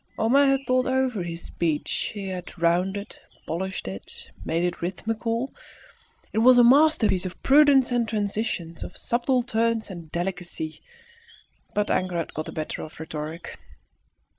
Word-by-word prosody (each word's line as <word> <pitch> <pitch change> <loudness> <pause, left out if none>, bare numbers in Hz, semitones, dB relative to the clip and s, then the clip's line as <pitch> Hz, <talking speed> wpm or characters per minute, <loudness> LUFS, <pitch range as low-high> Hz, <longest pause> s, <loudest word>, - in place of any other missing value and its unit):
Homais 270 +5 +4
had 270 0 +2
thought 255 +1 +2
over 260 -5 +1
his 170 -1 -5
speech; 160 -3 -2
he 195 -2 -4
had 180 -1 -7
rounded, 185 +5 0 0.3
polished 190 - -3
it, 95 +1 -8
made 165 +1 0
it 175 0 -2
rhythmical; 225 +7 -2 0.8
it 220 - +1
was 250 +2 +7
a 245 - +8
masterpiece 245 - +5
of 180 - -10
prudence 275 -2 +6
and 240 -2 +1
transitions, 205 -6 -2
of - - -9
subtle 245 +1 +1
turns 230 -2 0
and 170 -4 -9
delicacy; 175 -3 -4 0.9
but 210 0 +1
anger 185 -1 0
had 165 - -3
got 155 - -4
the - - -5
better 155 -1 -4
of 155 - -9
rhetoric. 160 +1 -6
200 Hz, 145 wpm, -25 LUFS, 170-245 Hz, 0.9 s, a